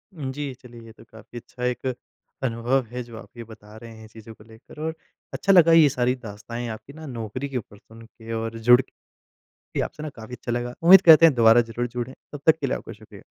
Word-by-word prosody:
उ 140 -5 -5
जी। 140 0 -5
चलिए 120 -2 -13
ये 115 - -13
तो - - -18
काफ़ी 115 +1 -14
अच्छा 125 +1 -10
एक 125 +1 -3 0.6
अनुभव 125 +2 0
है 125 0 -5
जो 115 -1 -12
आप 120 - -14
ये 115 - -7
बता 110 -1 -15
रहे 115 +1 -12
हैं 110 - -13
चीज़ों 110 0 -13
को - - -18
लेकर। 110 +6 -16
और 160 +1 -3 0.4
अच्छा 195 - +1
लगा 170 -3 +6
ये 160 -3 +6
सारी 125 -1 0
दास्ताएँ 115 +1 -8
आपकी 110 +5 -9
ना 160 +1 -11
नौकरी 125 +1 -6
के 130 - -3
ऊपर 105 -3 -9
सुन 110 +2 -17
के 115 0 -13
और 115 0 -4
जुड़ 120 +3 +5
के - - -22 0.8
कि - - -2
आपसे 150 - -6
ना 155 - -5
काफ़ी 115 +2 -9
अच्छा 120 - -6
लगा। 120 +1 -3
उम्मीद 180 +3 +8
करते 165 -3 +8
हैं 160 - +5
दोबारा 115 0 +6
ज़रूर 120 +1 -4
जुड़ें। 125 +1 -6 0.2
तब 145 - -7
तक 160 0 +5
के - - -2
लिए - - -1
आपका - - -10
शुक्रिया। - - -16
120 Hz, 240 wpm, -23 LUFS, 115-135 Hz, 0.8 s, उम्मीद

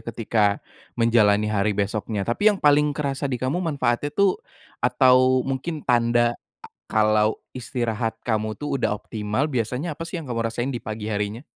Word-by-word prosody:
ketika 115 -1 -1 0.5
menjalani 110 -3 +3
hari 100 0 +1
besoknya. 105 0 -2
Tapi, 205 - +3
yang 210 - +1
paling 150 0 +3
kerasa 140 -1 -2
di 125 - -1
kamu 130 +9 -1
manfaatnya 145 -5 0
tuh, 200 -2 +3 0.4
atau 130 0 +4
mungkin 135 +4 -4
tanda 120 0 +3 0.5
kalau 110 0 +2 0.2
istirahat 115 -2 -3
kamu 110 -2 -1
tuh 145 -1 -2
udah 125 - 0
optimal, 105 +6 -2
biasanya 130 +5 -2
apa 165 - -5
sih 170 0 -5
yang 145 - -10
kamu 115 -2 -2
rasain 120 +3 -2
di 130 -3 -3
pagi 110 0 -5
harinya? 105 +3 -3
120 Hz, 155 wpm, -23 LUFS, 110-140 Hz, 0.5 s, atau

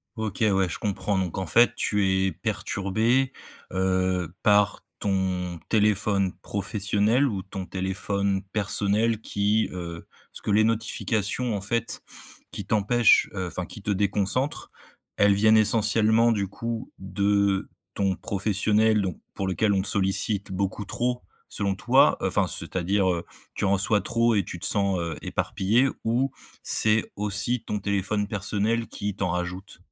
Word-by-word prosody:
OK, 110 -3 -4
ouais, 95 -4 +3
je - - -5
comprends 100 -1 -1
donc 90 -2 -3
en 95 - -2
fait 120 +9 +4
tu 105 -4 0 0.2
es 95 - 0
perturbé, 115 +7 0 0.4
heu, 95 -2 0
par 105 -1 +3 0.2
ton 90 -3 -1
téléphone 105 -3 +2
professionnel 105 +6 +1
ou 100 -6 -3
ton 95 -1 -7
téléphone 95 +1 -2
personnel 105 +2 +1
qui, 105 +2 0
heu 85 -2 -7 0.2
ce - - -7
que - - -5
les 105 +1 +4
notifications 110 +1 -1
en 100 - -3
fait, 115 +4 -2 0.5
qui - - -6
t'empêchent, 110 +2 +3
heu, 95 -1 -2
enfin 90 +1 -5
qui 105 - -11
te 105 - -1
déconcentre, 100 +7 -1 0.5
elles 100 -1 +4
viennent 110 +2 +5
essentiellement, 110 +1 +4
du 100 -3 0
coup, 115 +4 -5
de 100 +1 0 0.2
ton 95 -2 0
professionnel 105 +2 +1
donc 90 -4 -3 0.2
pour 95 - -3
lequel 100 +2 +1
on 95 - +1
te - - -4
sollicite 100 +1 0
beaucoup 100 +2 -2
trop 125 +4 -2 0.3
selon 100 -1 -1
toi, - - +4
enfin, - - +1
c'est-à-dire, 95 +1 0
heu, 85 0 -4 0.3
tu - - -3
reçois 100 +2 +2
trop 115 0 +1
et 100 - +2
tu 90 0 -8
te - - -3
sens, 100 -2 +1
heu, 85 -2 -3
éparpillé 110 +5 +1 0.2
ou 125 +4 0 0.3
c'est 110 0 +2
aussi 105 +4 +1
ton 105 -2 -3
téléphone 100 +1 -1
personnel 105 +3 -1
qui 100 -1 -5
t'en 95 -2 -2
rajoute? 90 +3 -4
100 Hz, 145 wpm, -25 LUFS, 95-110 Hz, 0.5 s, viennent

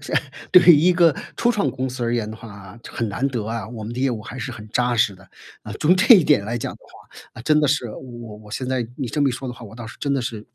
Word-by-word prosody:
是 - - -5 0.4
对 180 - +9
于 175 -2 +8
一 170 +5 +4
个 170 -3 +5 0.2
初 240 - +2
创 210 -4 0
公 130 0 -3
司 125 -1 -4
而 120 0 0
言 110 -3 -2
的 110 - -8
话， 100 -2 -12
很 115 -3 -3
难 125 +7 -1
得 120 -6 -3
啊， 115 -2 -4
我 115 -2 -8
们 110 - -6
的 120 - -6
业 135 - +2
务 110 -4 -3
还 130 - -9
是 125 +1 -5
很 110 -2 -10
扎 125 +2 +1
实 105 -3 +2
的。 95 0 -19 0.3
啊， - - -8
从 180 +5 +4
这 230 +6 +8
一 185 - +6
点 145 -9 +3
来 115 +3 -3
讲 - - -4
的 - - -15
话， - - -19 0.3
那 115 - -10
真 150 +3 +3
的 150 - +3
是 130 -4 0
我 120 -2 -9
我 105 0 -15
现 130 +2 -3
在 125 -3 -1
你 130 -4 -4
这 145 - -2
么 140 - +4
一 130 - -1
说 130 +1 -6
的 - - -4
话， 120 - -12
我 110 0 -12
倒 120 -1 -8
是 115 - -10
真 140 -1 -1
的 135 - -1
是 110 -3 -6
120 Hz, 330 characters per minute, -22 LUFS, 110-140 Hz, 0.4 s, 对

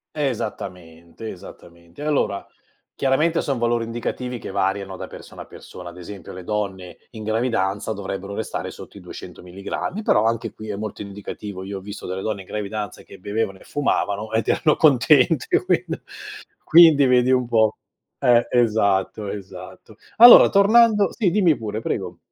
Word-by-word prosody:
Esattamente, 105 - -5
esattamente. 85 +3 -12
Allora, 140 -9 -1 0.5
chiaramente 155 +5 +1
son 135 -3 -2
valori 120 0 0
indicativi 120 +2 -4
che - - -8
variano 95 0 -2
da - - -7
persona - - -11
a - - -14
persona, 90 -1 -11
ad 85 +1 -12
esempio 95 +1 -10
le 90 -1 -9
donne 95 -3 -4
in 110 -2 -9
gravidanza 110 -2 -1
dovrebbero 100 0 -6
restare 110 - -4
sotto - - -12
i - - -10
200 - - -11
milligrammi, 100 - -5
però 110 - +2
anche 115 +1 -1
qui 110 0 -10
è 100 - -4
molto 105 -1 -6
indicativo, 100 -1 -8
io 100 0 -6
ho - - -10
visto 100 +2 -9
delle 95 +1 -4
donne 105 -3 -3
in - - -19
gravidanza 105 -1 -5
che - - -14
bevevano 100 0 -3
e - - -18
fumavano, 110 -7 -1
ed 110 0 0
erano 155 - +2
contente, 145 +1 +4
quindi - - -1 0.6
quindi 160 -4 +7
vedi 125 0 +3
un 125 -1 +2
po' 110 -2 +2 0.4
eh, 120 -1 +4
esatto, 105 -3 +1
esatto. 95 +1 -10 0.2
Allora 240 +1 +10
tornando 210 0 +4
sì 210 -6 0
dimmi 175 -5 +3
pure, 110 -1 -4
prego. 95 -5 -4
110 Hz, 160 wpm, -22 LUFS, 95-125 Hz, 0.6 s, Allora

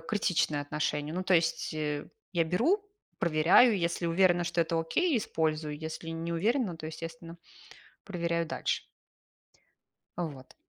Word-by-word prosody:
критичное 175 -8 0
отношение. 150 +1 -2
Ну, 185 - -1
то 185 -1 +3
есть, 165 0 +1
э, 150 -1 -2 0.3
я 170 -2 +2
беру, 310 - +2 0.3
проверяю. 170 +8 +5
Если 170 0 -1
уверена, 175 0 +3
что 170 0 0
это 165 0 +1
окей- 275 - +1
использую. 155 -6 -1
Если 160 +1 -6
не 165 +1 -3
уверена, 210 +1 +1
то, 155 -1 -7
естественно, 165 +1 -8 0.7
проверяю 170 -3 -1
дальше. - - -2 1.3
Вот. 145 -7 -5
165 Hz, 130 wpm, -30 LUFS, 155-180 Hz, 1.3 s, проверяю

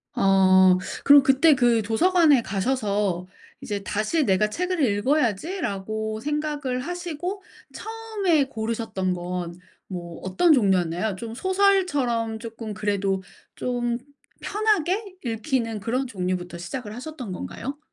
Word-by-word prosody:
어 190 -1 +5 0.3
그럼 285 0 +8
그때 275 +4 +5
그 240 -3 +3
도서관에 300 - +4
가셔서 200 -4 -1 0.3
이제 205 -7 -4
'다시 215 +11 0
내가 205 0 +2
책을 360 +5 -2
읽어야지.'라고 220 - -1
생각을 295 -1 -2
하시고 355 +4 -5 0.3
처음에 430 -9 0
고르셨던 220 -6 -2
건 175 -1 -5 0.3
뭐 175 -3 -7
어떤 190 - +3
종류였나요? 190 - +2
좀 225 +3 -7
소설처럼 290 - +1
쪼끔 225 -1 -7
그래도 200 -2 -1 0.3
좀 240 -1 -1 0.4
편하게 405 -1 0
읽히는 230 -1 -2
그런 250 +5 -1
종류부터 180 -5 -3
시작을 210 +5 -6
하셨던 255 -4 -7
건가요? 270 +9 -6
230 Hz, 270 characters per minute, -24 LUFS, 200-300 Hz, 0.4 s, 그럼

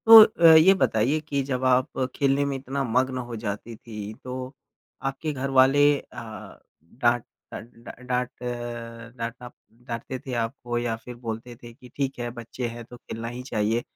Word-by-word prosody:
तो 225 0 +13
अ, 165 -6 +6
ये 175 +5 +7
बताइए 135 - +2
कि 145 -2 -1
जब 130 -1 -2
आप 130 0 +2 0.2
खेलने 140 0 +2
में 140 -1 -1
इतना 135 +1 -3
मग्न 130 +2 +1
हो 120 - -4
जाती 110 +2 -4
थीं 105 -2 -8
तो 130 +1 -6 0.6
आपके 150 +3 -4
घर 135 0 -3
वाले 135 +2 +6 0.2
अ, 115 -3 -10 0.2
डाँट 120 +6 +1 0.3
डा - - -4
डा 115 +1 -12
डाँट 125 0 -3
अ, 120 -1 -6
डाँटना 115 +1 -6 0.4
डाँटते 120 +2 -4
थे 135 -2 -7
आपको 120 +1 -4
या 120 -1 -1
फिर 125 - -8
बोलते 115 +2 -5
थे 120 0 -10
कि 125 0 -16
ठीक 135 -2 -2
है 120 0 -2
बच्चे 120 +1 -4
हैं 120 0 -7
तो 125 +1 -12
खेलना 115 -1 -7
ही 120 +2 -6
चाहिए, 110 +2 +1
125 Hz, 175 wpm, -25 LUFS, 115-135 Hz, 0.6 s, तो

